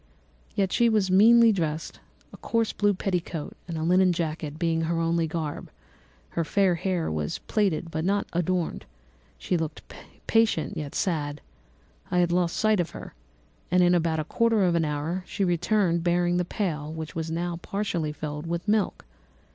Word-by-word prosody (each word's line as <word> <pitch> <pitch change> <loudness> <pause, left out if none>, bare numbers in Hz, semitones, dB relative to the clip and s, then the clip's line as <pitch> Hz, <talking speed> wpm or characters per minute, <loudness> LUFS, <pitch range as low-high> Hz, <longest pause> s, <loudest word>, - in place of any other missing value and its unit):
Yet 195 -3 +1
she 235 -1 +4
was 210 -4 +2
meanly 230 +4 +7
dressed, 160 -5 -3 0.3
a - - -10
coarse 230 -1 0
blue 205 -1 +2
petticoat 180 -5 -3
and 170 -2 -4
a 160 - -2
linen 180 +2 +4
jacket 155 -2 -3
being 165 -1 0
her 165 +1 -1
only 165 0 +1
garb; 155 -2 -4 0.6
her 165 - -1
fair 190 +2 +2
hair 175 - -1
was 75 -1 -2
plaited 180 -6 -1
but 160 0 -2
not 200 +3 +1
adorned: 175 0 -1 0.5
she 180 - -1
looked 160 -2 -4 0.4
patient 225 -2 +2
yet 150 -3 -5
sad. 150 -5 -1 0.7
I 180 0 +3
lost 175 0 +1
sight 215 -2 +3
of 175 - 0
her, - - -9 0.6
and 180 +1 +4
in 175 0 +4
about 165 -2 +1
a - - 0
quarter 225 +4 +2
of 180 -2 +3
an 165 -1 +2
hour 155 +5 -2
she 200 - -2
returned 175 0 +1
bearing 175 0 +2
the 180 - 0
pail, 155 -6 -3
which 160 -1 -6
was 165 -1 -3
now 170 +1 -2
partly 175 -4 -2
filled 150 +1 -6
with 170 +3 -3
milk. 210 - 0
175 Hz, 170 wpm, -26 LUFS, 160-190 Hz, 0.7 s, meanly